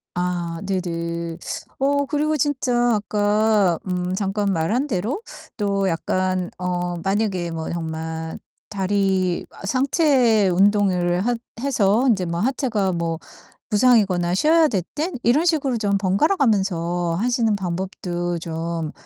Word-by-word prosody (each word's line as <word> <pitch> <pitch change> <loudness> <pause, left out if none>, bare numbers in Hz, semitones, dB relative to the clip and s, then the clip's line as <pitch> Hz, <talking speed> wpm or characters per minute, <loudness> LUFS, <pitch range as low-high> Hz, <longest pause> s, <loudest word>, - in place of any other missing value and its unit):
아 175 -2 -2
네네. 170 -3 -3 0.4
어 285 +1 +2
그리고 305 +2 0
진짜 245 -4 +1
아까 210 -2 +2
음 180 0 -2
잠깐 200 0 -1
말한 210 - 0
대로 230 - -2 0.4
또 200 -2 0
약간 185 +2 -1
어 180 -1 -2
만약에 195 -2 -1
뭐 160 -1 -4
정말 160 -1 -4 0.3
다리 190 -2 0
아 - - -11
상체 255 - +3
운동을 185 -1 +2
하 245 0 +2 0.3
해서 235 -3 +2
인제 195 -6 +2
뭐 170 0 -3
하체가 225 -5 0
뭐 165 -1 -2 0.5
부상이거나 205 -6 +3
쉬어야 315 - +4
될 195 -7 0
땐 325 +4 -2
이런 285 +9 +3
식으로 285 -7 +1
좀 200 -2 +1
번갈아가면서 190 - +1
하시는 235 -1 +1
방법도 175 -2 -3
좀 165 -1 -4
195 Hz, 235 characters per minute, -22 LUFS, 175-235 Hz, 0.5 s, 쉬어야